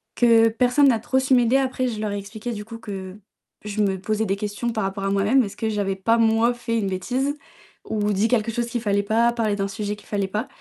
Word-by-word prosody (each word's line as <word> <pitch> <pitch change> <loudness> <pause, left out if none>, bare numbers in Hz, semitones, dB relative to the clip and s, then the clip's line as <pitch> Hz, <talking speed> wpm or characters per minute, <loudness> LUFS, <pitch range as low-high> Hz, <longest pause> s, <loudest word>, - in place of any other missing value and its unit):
que 230 -2 +5
personne 250 +5 +3
n'a 230 -3 +2
trop 260 +4 0
su 265 0 +1
m'aider. 245 +1 +4
Après 260 -1 0
je 225 -3 -4
leur 210 -1 -2
ai 205 - -3
expliqué 215 +4 -6
du 210 -2 -6
coup 230 +1 -9
que 190 -3 -7 0.5
je 210 0 -2
me 195 -2 0
posais 215 +3 -1
des 195 -1 0
questions 210 +3 -3
par 220 -2 -2
rapport 195 +1 -3
à 195 - 0
moi-même. 205 +7 +3
Est-ce 200 - -7
que 220 - -1
je 210 -1 -2
avais 195 -1 -1
pas 225 +5 +2
moi 225 +1 +3
fait 235 -1 -3
une 205 -3 -1
bêtise 250 +10 -1 0.5
ou 210 -1 -1
dit 200 +3 +2
quelque 230 -1 +1
chose 235 +1 -2
qu'il 240 0 -3
ne - - -11
fallait 200 -1 +1
pas, 225 +3 +2
parler 220 -3 0
d'un 195 -1 -1
sujet 205 +1 -4
qu'il - - -18
fallait 200 -2 -1
pas? 210 +6 -3
220 Hz, 260 wpm, -23 LUFS, 200-235 Hz, 0.5 s, que